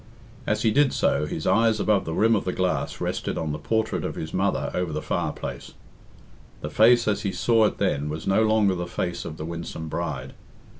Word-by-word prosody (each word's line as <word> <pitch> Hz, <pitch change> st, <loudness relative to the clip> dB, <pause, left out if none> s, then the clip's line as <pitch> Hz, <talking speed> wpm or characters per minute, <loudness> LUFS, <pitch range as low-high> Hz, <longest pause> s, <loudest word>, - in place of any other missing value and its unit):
As -, -, 0 dB
he 110 Hz, -, +3 dB
did 145 Hz, +3 st, +3 dB
so, 75 Hz, -, +1 dB
his 80 Hz, -, -4 dB
eyes 110 Hz, +3 st, +3 dB
above 105 Hz, -2 st, +2 dB
the 80 Hz, -, -3 dB
rim 115 Hz, +1 st, +4 dB
of 105 Hz, -, 0 dB
the 90 Hz, -, -1 dB
glass 90 Hz, 0 st, -1 dB
rested -, -, -2 dB
on 80 Hz, -2 st, -2 dB
the 75 Hz, -, -4 dB
portrait 110 Hz, +7 st, -1 dB
of -, -, -3 dB
his 80 Hz, -, -6 dB
mother 95 Hz, +1 st, 0 dB
over 90 Hz, -3 st, -1 dB
the 75 Hz, -, -2 dB
fireplace. -, -, -4 dB, 0.9 s
The 75 Hz, -, -5 dB
face 115 Hz, +5 st, +5 dB
as 105 Hz, -1 st, +1 dB
he 100 Hz, -, -1 dB
saw 110 Hz, +5 st, +3 dB
it 105 Hz, -, -1 dB
then 75 Hz, +1 st, 0 dB
was 80 Hz, +1 st, -5 dB
no 95 Hz, +3 st, +3 dB
longer 110 Hz, -3 st, +3 dB
the 90 Hz, -1 st, -4 dB
face 85 Hz, 0 st, -3 dB
of 80 Hz, -1 st, -6 dB
the 75 Hz, -, -5 dB
winsome 85 Hz, -1 st, -6 dB
bride. 70 Hz, -6 st, -4 dB
95 Hz, 210 wpm, -25 LUFS, 80-110 Hz, 0.9 s, face